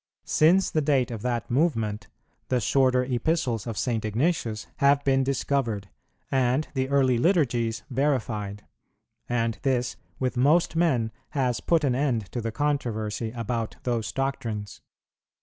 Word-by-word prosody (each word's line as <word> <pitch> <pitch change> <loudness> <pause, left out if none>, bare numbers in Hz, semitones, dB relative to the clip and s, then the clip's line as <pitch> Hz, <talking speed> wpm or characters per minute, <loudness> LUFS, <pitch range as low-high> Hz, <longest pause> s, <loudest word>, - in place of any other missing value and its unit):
Since 175 +5 +4
the 155 - +1
date 135 -4 +2
of 115 -3 -5
that 120 -1 -2
movement, 115 -7 0 0.4
the 125 - +1
shorter 130 +2 +3
Epistles 125 - -1
of 115 -3 -4
St. 115 -4 -1
Ignatius 115 - -1
have 140 0 +4
been 135 -1 +3
discovered, 130 -6 -1 0.4
and 130 +2 +2
the 130 -1 -1
early 130 -3 +3
Liturgies 120 - +1
verified; 110 -7 -1 0.6
and 115 -2 0
this 125 -2 0 0.2
with 130 -1 -2
most 155 +7 +3
men 135 -10 +2 0.3
has 125 -4 +1
put 165 -2 +2
an 135 -3 +2
end 125 -6 -1
to 120 - -3
the 115 0 -3
controversy 115 -5 -1
about 115 -1 -3
those 115 -6 -1
doctrines. 115 -6 -3
125 Hz, 135 wpm, -26 LUFS, 115-140 Hz, 0.6 s, Since